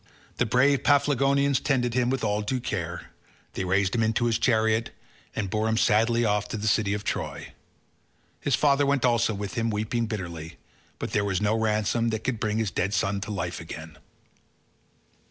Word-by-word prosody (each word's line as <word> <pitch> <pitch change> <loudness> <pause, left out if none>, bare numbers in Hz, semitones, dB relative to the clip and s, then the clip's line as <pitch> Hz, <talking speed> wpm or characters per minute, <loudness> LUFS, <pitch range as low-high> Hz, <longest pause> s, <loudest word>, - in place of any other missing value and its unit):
The 120 - +1
brave 130 +4 +3
Paphlagonians 140 -1 +3
tended 125 -4 0
him 125 0 +1
with 130 -1 -1
all 105 -1 0
due 125 +5 -2
care; 85 -7 -4 0.4
they - - -3
raised 95 +1 +1
him 115 - +1
into 110 +2 +1
his 115 -2 +1
chariot, 110 -1 +2 0.5
and 105 - -2
bore 110 +3 -1
him 110 - +1
sadly 115 +2 +3
off 105 -1 +1
to - - -4
the 105 - -5
city 105 -1 +2
of 105 - -5
Troy; - - -4 0.9
his 140 - +1
father 145 -1 +3
went 140 -2 +2
also 120 -2 +2
with 100 0 -5
him 115 0 0
weeping 110 +2 -1
bitterly, 85 -7 -6 0.4
but - - -5
there 105 - +1
was 95 -2 0
no 105 +1 +1
ransom 110 +1 +1
that 110 -1 -3
could 130 -4 -2
bring 110 -1 -1
his 110 -4 -1
dead 100 +4 -1
son 100 0 0
to 105 - -6
life 90 -3 -3
again. 80 -1 -9
110 Hz, 185 wpm, -26 LUFS, 100-120 Hz, 0.9 s, brave